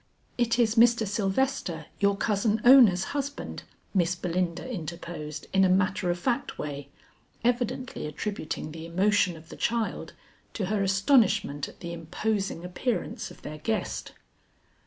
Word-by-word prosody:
"It 240 -1 +1
is 230 -3 +3
Mr. 235 -1 +5
Sylvester, 200 - -1
your 200 0 +3
cousin 210 +1 +1
Ona's 240 -8 +8
husband," 285 0 -4 0.3
Miss 180 -2 +2
Belinda 175 +2 -2
interposed 165 - -6
in 195 0 +5
a 190 - +4
matter 185 0 +2
of 175 - +1
fact 240 +7 -1
way, 145 -1 -5 0.5
evidently 245 -4 -1
attributing 155 -1 -4
the 160 +1 -8
emotion 185 0 +2
of 160 +1 -15
the - - -9
child 230 -1 -1 0.4
to 200 - -1
her 205 - +1
astonishment 195 - +3
at - - -17
the 170 -1 -5
imposing 185 +2 -2
appearance 185 +3 -2
of - - -15
their 155 +1 -7
guest. 220 +7 -2
195 Hz, 135 wpm, -27 LUFS, 170-225 Hz, 0.5 s, Ona's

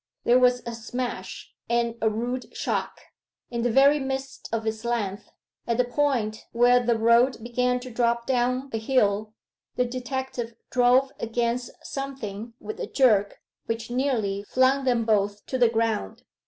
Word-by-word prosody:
There 245 +1 +5
was 250 -1 +3
a 235 - -4
smash; 245 +2 -5 0.2
and 235 -1 +1
a 220 - +3
rude 240 +4 -4
shock. - - -2 0.5
In 235 -1 -2
the 240 - +1
very 275 +5 +5
midst 265 0 -5
of 225 0 -2
its 220 0 -3
length, 215 -5 -2 0.4
at 235 -1 +1
the 250 - +4
point 245 -5 -1
where 245 +1 +5
the 240 -1 +1
road 235 +3 +4
began 250 +1 0
to 255 0 -8
drop 235 0 +1
down 255 +1 0
a 225 - 0
hill, 215 -3 +1 0.4
the 250 - +2
detective 250 -1 -4 0.2
drove 255 +2 +4
against 235 +2 -1
something 235 -5 -6
with 430 +1 -7
a 470 - -3
jerk 215 - +2 0.3
which 230 +1 -3
nearly 235 -7 0
flung 265 +1 +3
them 240 -3 +2
both 205 -2 +1
to 260 - -3
the 240 -2 +5
ground. 225 - -1
240 Hz, 155 wpm, -25 LUFS, 225-255 Hz, 0.5 s, There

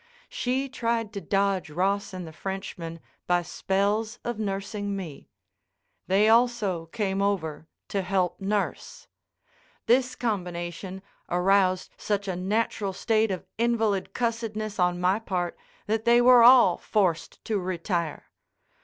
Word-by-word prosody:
She 260 +2 -1
tried 230 -4 -2
to 200 - -5
dodge 195 -3 0
Ross 195 +6 0
and 185 -2 -6
the 160 - -10
Frenchman 175 -3 -6 0.3
by 175 0 +2
spells 205 +6 -1
of 240 -2 -3
nursing 200 0 -3
me. 170 -7 -8 0.8
They 195 +3 +4
also 220 -7 +2
came 195 +1 -2
over 160 -6 -1 0.2
to 200 - -1
help 185 -1 0
nurse. 200 +1 -3 0.8
This 255 +1 +3
combination 185 -3 -4 0.3
aroused 185 +1 +2
such 205 -1 -1
a 185 - -2
natural 200 +1 -1
state 220 +2 +1
of 185 -2 -4
invalid 225 -4 0
cussedness 220 -3 -2
on 180 0 +2
my 185 +3 +2
part 180 -5 -2 0.3
that 220 +1 -1
they 235 0 +6
were 245 0 +7
all 240 -6 +7
forced 185 -6 -1
to 215 -2 0
retire. 175 -3 -3
200 Hz, 125 wpm, -26 LUFS, 180-220 Hz, 0.8 s, were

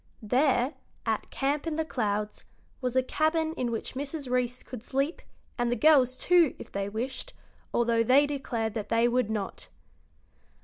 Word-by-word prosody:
There, 255 +3 +2 0.3
at - - -1
Camp 285 +3 -1
in 320 - -1
the 320 0 -1
Clouds, 210 -6 -2 0.4
was 250 -1 -2
a 260 - +4
cabin 315 +3 +1
in 250 -6 -2
which 230 -1 -4
Mrs. 280 0 -4
Reece 250 0 0
could 250 -4 -8
sleep, 275 +7 -1 0.4
and 240 0 +1
the - - +2
girls, 255 -1 +5
too, 345 -5 +4
if - - -10
they 200 0 -2
wished, 260 - -4 0.4
although 235 -1 +2
they 260 +5 +5
declared 245 -6 -2
that 210 -2 -4
they 230 +1 +3
would 245 -2 +1
not. 210 -3 -4
255 Hz, 165 wpm, -28 LUFS, 230-285 Hz, 0.4 s, girls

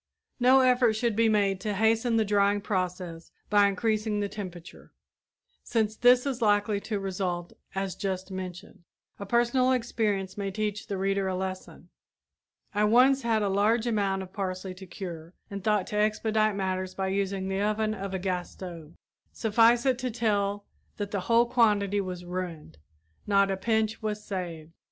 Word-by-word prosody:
No 255 +2 +6
effort 250 -3 +4
should 225 0 0
be 225 +1 +3
made 200 -3 +1
to 210 -2 -2
hasten 225 +2 +2
the 220 - +2
drying 205 0 +2
process 180 -4 -3 0.2
by 205 -1 +6
increasing 215 +1 0
the 205 - 0
temperature, 180 -5 -9 0.7
since 220 -2 0
this 245 +3 +5
is 260 -3 -2
likely 205 -1 +2
to 210 0 -3
result 180 -3 -3 0.2
as 195 -1 -2
just 190 -1 -4
mentioned. 185 -2 -7 0.4
A 200 - -6
personal 240 +3 +2
experience 210 -6 -1
may 200 -1 -2
teach 210 +1 -3
the 200 - -3
reader 195 0 0
a 185 - -1
lesson. 185 0 -6 0.8
I 210 0 +1
once 255 +5 +5
had 225 -3 +1
a - - +1
large 210 +4 +2
amount 200 -4 0
of 185 0 -13
parsley 185 -2 -4
to 185 +1 -12
cure 175 -2 -8 0.2
and 200 -1 -5
thought 210 -3 +2
to 210 - -3
expedite 215 0 +1
matters 185 -1 -2
by 190 -1 -1
using 195 0 -1
the 195 +1 -1
oven 215 +1 0
of 195 -2 -5
a - - 0
gas 180 -1 -2
stove. 170 -4 -9 0.4
Suffice 230 +3 +3
it 260 -2 +2
to 255 -1 -2
tell 205 -3 0 0.3
that 205 -1 -4
the 200 - -1
whole 230 +1 +5
quantity 210 -4 +2
was 180 -2 -6
ruined, 175 - -6 0.5
not 200 -1 +3
a - - 0
pinch 220 +2 0
was 210 -1 -3
saved. 170 -5 -5
200 Hz, 170 wpm, -28 LUFS, 190-220 Hz, 0.8 s, No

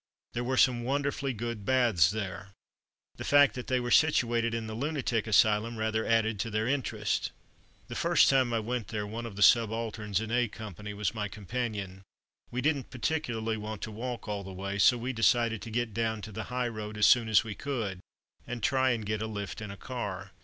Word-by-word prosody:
There 120 - -2
were 130 +1 -1
some 125 -2 +4
wonderfully 140 +1 -1
good 115 -2 -4
baths 115 - +4
there. 100 -2 -5 0.6
The - - -5
fact 145 0 +5
that 125 - -6
they 130 -1 +1
were 120 0 -3
situated 120 -7 +3
in 115 0 -3
the 110 - -6
lunatic 125 -4 -1
asylum 110 +2 +3
rather 110 0 -1
added 110 -2 +2
to 115 - -1
their 110 +1 -1
interest. 135 -1 -1 0.6
The - - -7
first - - +4
time 130 -3 +3
I 115 -1 +1
went 120 -1 -3
there, 105 -1 -3
one 115 +3 -5
of 105 - -9
the 105 - +2
subalterns 110 -3 +3
in 110 0 -4
A 120 0 +2
Company 105 -1 -8
was 105 -3 -1
my 105 -2 -2
companion. 105 -2 -4 0.5
We 125 - -3
didn't 145 -2 0
particularly 120 -5 -2
want 105 0 -6
to 110 - -4
walk 120 +2 -5
all 100 -1 -3
the 95 - -8
way, 100 +2 -4
so 125 +5 +6
we 125 +3 -3
decided 115 -1 +2
to 115 - -7
get 115 -1 -2
down 110 -2 -1
to 110 - -7
the 110 +2 -5
high 125 0 -1
road 110 -2 -6
as 105 - +4
soon 115 -3 +5
as 110 +2 +5
we 110 -2 -5
could, 110 -8 -3 0.5
and 120 -1 -5
try 130 -1 +3
and 115 -4 -1
get 105 +1 -2
a 110 - -2
lift 105 0 -5
in 105 - -6
a 100 - -8
car. 100 -6 -5
115 Hz, 210 wpm, -29 LUFS, 105-120 Hz, 0.6 s, so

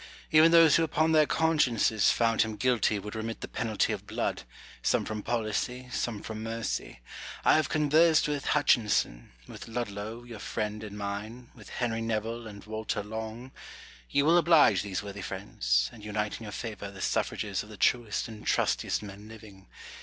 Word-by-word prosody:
Even 160 +1 +7
those 165 -3 +7
who 165 - +2
upon 160 0 +1
their 155 -2 +5
consciences 130 -10 +2
found 115 -1 +2
him 110 -1 0
guilty 115 -1 +1
would 105 +1 -7
remit 110 +1 -5
the - - -5
penalty 110 -3 -1
of - - -7
blood, - - -2 0.4
some - - +1
from 110 -1 -4
policy, 120 +3 -2
some 115 -4 -3
from 110 -1 -6
mercy. 115 - -4 0.4
I - - +6
have 155 - +2
conversed 155 +2 +4
witli 145 -1 -1
Hutchinson, 110 - +1 0.2
with - - -10
Ludlow, 110 0 -5
your 120 -3 -10
friend 105 0 -4
and 105 -1 -8
mine, 105 +4 -6
with - - -14
Henry 115 -2 -2
Nevile, 115 +1 -3
and 100 -2 -10
Walter 110 -1 -3
Long: 110 +4 -6 0.6
you 140 - +2
will 170 +3 +6
oblige 150 - +5
these 100 -1 -4
worthy 100 0 -7
friends, - - -1
and 105 - -13
unite 105 0 -2
in 115 - -9
your 105 - -7
favour 100 0 -6
the 100 0 -12
suffrages 100 0 -1
of 105 - -11
the 105 - -11
truest 115 +2 +1
and 110 -2 -10
trustiest - - +1
men 100 +1 -10
living. 105 -4 -13
110 Hz, 175 wpm, -29 LUFS, 105-125 Hz, 0.6 s, Even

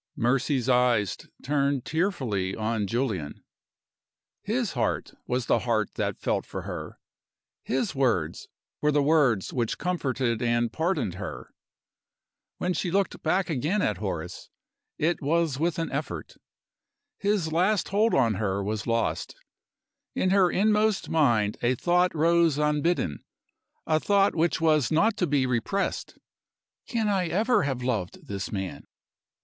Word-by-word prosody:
Mercy's 130 +1 +1
eyes 120 -7 +3 0.3
turned 140 -2 0
tearfully 130 - -1
on 110 -1 -1
Julian. 105 - -2 1.0
His - - -1
heart - - -1
was 125 -1 -1
the - - +3
heart 110 -4 0
that - - -2
felt - - -1
for - - -7
her! - - -6 0.6
His 130 +3 -1
words 110 - 0 0.3
were 150 - +3
the 145 -1 +2
words 140 - +2
which 120 -4 -1
comforted 130 -9 -1
and 120 -1 +1
pardoned 160 - 0
her! - - -7 1.0
When 180 0 -1
she 175 +2 -2
looked 195 +1 0
back 180 +4 +1
again 160 +9 0
at 105 - 0
Horace, 90 -4 -5 0.5
it 170 +3 0
was 155 -1 +1
with 165 0 0
an 165 -1 -2
effort. - - -4 0.9
His 200 -6 0
last 185 +5 +2
hold 215 +3 +2
on 115 -4 +3
her 100 -1 -1
was 110 +2 -3
lost. 115 0 -1 0.8
In 185 - +1
her 190 -2 +5
inmost 210 +2 +2
mind 115 -10 +2
a 120 +2 +2
thought 180 +5 +2
rose 165 -1 +3
unbidden 150 - 0 0.7
a 155 0 +2
thought 200 +3 +3
which 170 +1 +1
was 155 -5 +2
not 205 +8 +3
to 180 - +1
be 140 -3 +2
repressed. 125 - -2 0.7
"Can 225 -3 0
I 190 -4 +1
ever 215 +9 +2
have 135 -4 -2
loved 110 -8 -3
this 100 -1 -5
man?" 95 -2 -5
140 Hz, 135 wpm, -27 LUFS, 115-175 Hz, 1.0 s, her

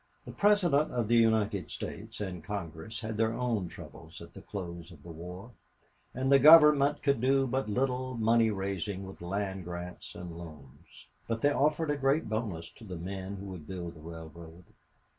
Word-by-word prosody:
The - - -7
President 180 -8 +3
of 120 -3 -1
the 120 - +3
United 110 -4 +2
States - - -7
and 90 -5 -5
Congress 95 +2 -6
had 110 0 -4
their 110 +1 +1
own 115 -7 -1
troubles - - -11
at - - -12
the - - -10
close 85 -3 -7
of 80 - -15
the 85 - -9
war, 90 +7 -9 0.6
and 130 +2 -1
the 140 - +8
Government 150 -1 +7
could 140 -5 +2
do 135 +1 +3
but 130 -2 -1
little 130 +2 -1
money 115 0 +4
raising 95 -1 -3
with 95 -1 -11
land 95 +1 -3
grants 90 +1 -7
and 90 -2 -7
loans. 75 -6 -13 0.2
But 115 -1 -2
they 145 - +4
offered 150 +2 +1
a 145 - -1
great 135 -1 +1
bonus 105 -7 -3
to - - -14
the 95 -5 -7
men 95 +3 -5
who 100 0 -8
would 90 -6 -8
build 90 -2 -5
the 80 - -14
railroad. 80 +1 -10
105 Hz, 180 wpm, -30 LUFS, 90-130 Hz, 0.6 s, the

